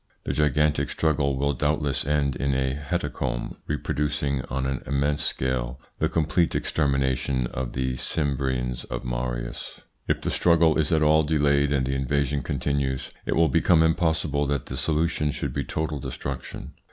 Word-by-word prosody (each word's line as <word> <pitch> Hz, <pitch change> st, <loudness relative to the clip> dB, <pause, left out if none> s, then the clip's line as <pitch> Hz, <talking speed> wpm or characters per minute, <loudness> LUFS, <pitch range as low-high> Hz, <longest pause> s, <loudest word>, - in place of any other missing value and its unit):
This -, -, -2 dB
gigantic 75 Hz, 0 st, +2 dB
struggle 70 Hz, -4 st, +1 dB
will 70 Hz, +1 st, +1 dB
doubtless 75 Hz, 0 st, 0 dB
end 70 Hz, -2 st, +1 dB
in 70 Hz, -1 st, 0 dB
a 65 Hz, 0 st, +1 dB
hecatomb 70 Hz, -4 st, -3 dB
reproducing 75 Hz, -2 st, -1 dB
on 65 Hz, +1 st, -2 dB
an 65 Hz, -1 st, -2 dB
immense 70 Hz, +2 st, 0 dB
scale 65 Hz, -1 st, -1 dB, 0.2 s
the -, -, +2 dB
complete 80 Hz, +2 st, +1 dB
extermination 70 Hz, -3 st, 0 dB
of -, -, -4 dB
the 65 Hz, 0 st, -1 dB
Cimbrians 65 Hz, -4 st, -1 dB
by -, -, -2 dB
Marius. -, -, -4 dB, 0.3 s
If -, -, +1 dB
the -, -, -1 dB
struggle 85 Hz, -2 st, +4 dB
is 75 Hz, -, +1 dB
at 80 Hz, -1 st, +3 dB
all 80 Hz, +1 st, +5 dB
delayed 70 Hz, -2 st, +2 dB
and 70 Hz, -3 st, +2 dB
the 65 Hz, -, -1 dB
invasion 70 Hz, +1 st, 0 dB
continues, 70 Hz, -2 st, -1 dB, 0.2 s
it -, -, +1 dB
will 80 Hz, -1 st, +4 dB
become 80 Hz, +4 st, +4 dB
impossible 80 Hz, -3 st, +1 dB
that 70 Hz, -2 st, -1 dB
the -, -, -6 dB
solution 80 Hz, -1 st, 0 dB
should 70 Hz, -2 st, -3 dB
be 70 Hz, 0 st, -1 dB
total 75 Hz, 0 st, -3 dB
destruc 65 Hz, +1 st, -4 dB
tion. -, -, -8 dB
70 Hz, 160 wpm, -25 LUFS, 65-75 Hz, 0.3 s, all